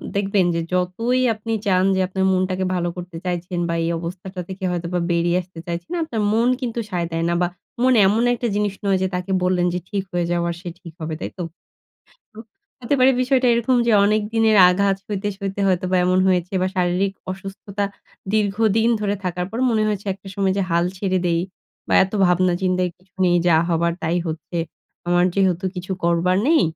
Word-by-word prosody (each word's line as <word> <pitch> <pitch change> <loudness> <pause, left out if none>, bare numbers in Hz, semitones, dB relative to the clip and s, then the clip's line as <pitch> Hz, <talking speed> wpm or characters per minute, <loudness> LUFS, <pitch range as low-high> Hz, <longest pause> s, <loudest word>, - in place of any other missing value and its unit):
দেখবেন 200 -2 +2
যে, 170 - 0
যতই 225 +8 0
আপনি 220 +1 -6
চান 185 -2 +3
যে, - - 0
আপনার 190 0 -1
মনটাকে 185 0 0
ভালো 175 -1 -1
করতে 175 -1 -7
চাইছেন 175 0 -3
বা 170 - 0
এই 165 - 0
অবস্থাটা 180 +2 -6
থেকে 190 +1 -7
হয়তোবা 175 0 -2
বেরিয়ে 170 +1 +2
আসতে 180 -2 -13
চাইছেন। 170 0 -5
আপনার 235 -9 -3
মন 230 +2 +3
কিন্তু 235 -2 -3
সায় 175 -3 -2
দেয় 165 0 -1
না - - +1
বা 175 - +3 0.3
মন 255 0 +4
এমন 220 +4 +2
একটা 240 0 -2
জিনিস 205 -1 0
নয় 195 -1 +3
যে, 190 - +2
তাকে 180 +2 -4
বললেন 180 -1 +2
যে 180 - -1
ঠিক 200 -2 -2
হয়ে 175 -1 0
যাওয়ার, 170 0 0
সে 180 - -6
ঠিক 170 -3 -11
হবে, 160 0 -3
তাই - - -4
তো? - - -1 1.4
হতে 250 +3 0
পারে 260 +1 +6
বিষয়টা 255 0 +2
এরকম 235 +2 +2
যে, 235 - +3
অনেক 215 +1 +2
দিনের 220 -1 +4
আঘাত 195 +2 +2
সইতে, 205 0 -3
সইতে, 200 0 -4
হয়তোবা 185 0 +1
এমন 185 +1 +2
হয়েছে 180 -1 0
বা 185 - +1
শারীরিক 180 +2 +1 0.2
অসুস্থতা 195 +1 -5 0.5
দীর্ঘদিন 215 +1 +2
ধরে 205 -1 0
থাকার 180 0 -2
পর 225 - -5
মনে 220 -1 +2
হয়েছে 205 -1 -3
একটা 195 0 -13
সময় 195 -1 +1
যে, 195 - +2
হাল 170 +1 +2
ছেড়ে 190 -2 0
দেই 170 -1 +1 0.5
বা - - +2
এত 190 - -8
ভাবনা, 180 +1 +3
চিন্তার 185 -1 +1
কিছু 185 0 -31
নেই, 175 -1 +4
যা 170 -2 +5
হবার 170 0 +1
তাই 165 +2 0
হচ্ছে। 160 +2 -4 0.5
আমার 175 0 +4
যেহেতু 190 -2 +1
কিছু 180 +1 -5
করবার 170 +2 +2
নেই, 325 -6 +5
185 Hz, 195 wpm, -21 LUFS, 175-205 Hz, 1.4 s, পারে